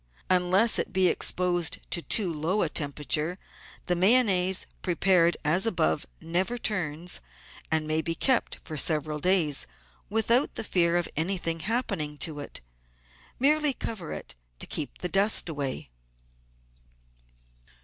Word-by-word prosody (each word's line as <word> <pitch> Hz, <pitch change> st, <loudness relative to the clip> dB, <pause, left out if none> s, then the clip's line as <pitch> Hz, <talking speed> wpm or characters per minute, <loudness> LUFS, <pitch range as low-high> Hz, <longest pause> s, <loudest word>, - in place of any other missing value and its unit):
Unless 185 Hz, +5 st, +4 dB
it -, -, -2 dB
be 185 Hz, -1 st, +3 dB
exposed 175 Hz, -1 st, +1 dB
to 170 Hz, -, 0 dB
too 185 Hz, -1 st, +2 dB
low 165 Hz, +7 st, 0 dB
a 165 Hz, -, 0 dB
temperature, 150 Hz, +3 st, 0 dB, 0.5 s
the 180 Hz, -, 0 dB
Mayonnaise, 190 Hz, -2 st, +4 dB, 0.2 s
prepared 175 Hz, -1 st, +2 dB
as 175 Hz, +8 st, +3 dB
above, 80 Hz, -, 0 dB
never 185 Hz, +8 st, -1 dB
turns, 175 Hz, -6 st, -2 dB, 0.5 s
and 160 Hz, -1 st, +1 dB
may 155 Hz, +1 st, 0 dB
be 165 Hz, +1 st, -3 dB
kept 260 Hz, +4 st, 0 dB
for 155 Hz, -, -7 dB
several 150 Hz, 0 st, 0 dB
days 170 Hz, -4 st, +3 dB, 0.4 s
without 230 Hz, +5 st, +2 dB
the -, -, -2 dB
fear 175 Hz, -4 st, +2 dB
of 175 Hz, -, 0 dB
anything 165 Hz, 0 st, -1 dB
happening 195 Hz, -8 st, -2 dB
to 150 Hz, -1 st, -4 dB
it. 145 Hz, -, -8 dB, 0.8 s
Merely 295 Hz, +2 st, +3 dB
cover 210 Hz, -8 st, -6 dB
it -, -, -7 dB, 0.2 s
to -, -, -4 dB
keep 150 Hz, -, -5 dB
the 180 Hz, -, -3 dB
dust 195 Hz, +3 st, +2 dB
away. 140 Hz, -, -4 dB
175 Hz, 130 wpm, -27 LUFS, 155-195 Hz, 0.8 s, Unless